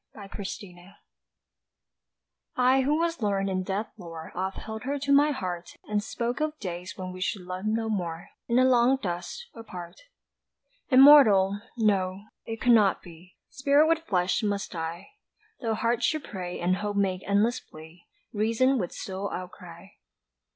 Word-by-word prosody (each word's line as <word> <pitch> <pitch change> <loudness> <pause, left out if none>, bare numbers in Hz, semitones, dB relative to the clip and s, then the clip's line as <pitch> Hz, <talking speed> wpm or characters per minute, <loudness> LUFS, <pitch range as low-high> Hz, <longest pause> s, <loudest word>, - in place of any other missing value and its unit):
TRANSCENDED 195 -2 -9 1.6
I 255 +1 +4
who 290 +3 +1
was 335 0 0
learnèd 200 -3 0
in 185 0 0
death's 200 +3 -4
lore 165 -3 -9
Oft 190 +2 -3
held 220 0 -7
her 275 +4 -2
to 280 0 -2
my 285 +2 +6
heart 180 -10 -4
And 210 -1 0
spoke 240 +3 -3
of 310 0 -1
days 180 - -6
when 185 -1 -5
we 185 - -9
should 190 0 -2
love 185 +2 -6
no 225 +1 0
more 175 -6 -3 0.2
In 235 - 0
the 255 - +5
long 255 +1 +4
dust, 180 - -5
apart. 180 -6 -10 0.9
"Immortal?" 225 -8 +7 0.2
No 195 -4 +1 0.3
it 225 0 -5
could 245 - +3
not 210 -5 +4
be, 175 +1 -15 0.2
Spirit 280 +2 +3
with 330 0 +3
flesh 185 - 0
must 205 -2 -2
die. 165 +2 -5 0.5
Tho' 225 -3 -1
heart 230 +2 0
should 310 +3 0
pray 180 -3 -6
and 180 +2 +1
hope 205 0 -3
make 190 -2 0
endless 210 +5 +2
plea, 160 +2 -15 0.3
Reason 230 +5 +2
would 180 -4 -3
still 195 +1 -5
outcry. 180 0 -9
205 Hz, 155 wpm, -27 LUFS, 185-245 Hz, 1.6 s, Immortal